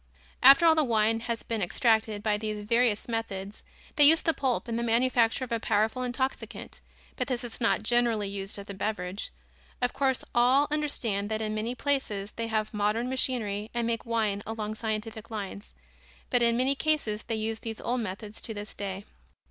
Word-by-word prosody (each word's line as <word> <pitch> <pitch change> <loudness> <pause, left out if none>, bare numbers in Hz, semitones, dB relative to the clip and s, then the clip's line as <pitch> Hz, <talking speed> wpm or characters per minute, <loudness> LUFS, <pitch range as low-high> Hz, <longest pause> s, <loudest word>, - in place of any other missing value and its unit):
After 275 +6 +8
all 325 - +7
the 315 -1 +3
wine 225 -2 +2
has 230 0 -3
been 225 -2 -3
extracted 220 +2 +1
by 215 -1 +2
these 210 0 -4
various 230 0 +2
methods, 210 -4 -4 0.4
they 295 - +7
use 320 +3 +8
the 325 - +2
pulp 260 -4 -1
in 230 - -2
the 235 - -1
manufacture 235 +1 +2
of 250 - -7
a 230 - 0
powerful 220 +4 +1
intoxicant, 255 +2 -4 0.4
but - - -1
this 250 -2 -2
is 240 0 -7
not 230 -2 +2
generally 235 -3 +2
used 195 0 -5
as 200 0 -9
a 200 - -6
beverage. 190 -1 -3 0.5
Of 245 0 0
course, 265 -2 0
all 255 +4 +4
understand 235 -9 0
that 220 0 -1
in 215 -1 -2
many 220 +3 -2
places 220 -8 -1
they 230 0 -4
have 215 0 -1
modern 210 +4 0
machinery 220 -5 -1
and 235 -1 0
make 230 0 -1
wine 220 -3 0
along 215 -1 -3
scientific 220 0 -4
lines, 205 -2 -6 0.6
but 245 - +3
in 235 0 +3
many 260 +2 +3
cases 280 -8 0
they 225 - -3
use 220 0 -2
these 225 -1 -5
old 245 +1 -1
methods 210 +1 -6
to 225 - -6
this 205 +1 -7
day. 195 -1 -5
225 Hz, 190 wpm, -28 LUFS, 210-245 Hz, 0.6 s, After